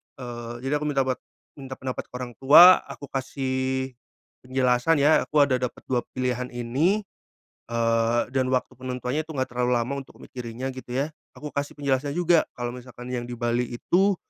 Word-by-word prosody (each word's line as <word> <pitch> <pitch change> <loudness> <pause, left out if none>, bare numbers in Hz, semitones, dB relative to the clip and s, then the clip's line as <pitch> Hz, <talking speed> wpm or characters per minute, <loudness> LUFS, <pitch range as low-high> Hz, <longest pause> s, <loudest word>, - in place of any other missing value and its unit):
Eee, 120 -2 -7
jadi 145 +3 0
aku 150 - -4
minta 135 -2 +2
bat 130 -1 -2 0.4
minta 135 -1 -7
pendapat 130 0 -5
ke - - -51
orang 125 -1 -5
tua, 170 +7 +9
aku - - -10
kasih 130 0 -2 0.6
penjelasan 130 +4 +2
ya, 150 +1 +5
aku 150 -1 +4
ada 130 -3 +1
dapat 125 -1 -4
2 125 -2 0
pilihan 125 -1 -1
ini, 145 - +1 0.6
eee, 115 0 +2
dan 130 -1 +1
waktu 130 -1 0
penentuannya 130 +4 -3
itu 160 - -8
enggak 130 -1 -2
terlalu 125 0 0
lama 120 +3 -1
untuk 135 - -13
mikirinnya 125 +1 -6
gitu 130 -1 -8
ya. 140 +4 0 0.2
Aku 150 -1 -7
kasih 140 0 -3
penjelasannya 140 0 -1
juga 175 -2 +3
kalau 120 -1 -3
misalkan 125 0 -9
yang 120 -1 -3
di 120 - -5
Bali 120 +1 0
itu, 190 - +2
130 Hz, 175 wpm, -25 LUFS, 125-140 Hz, 0.6 s, tua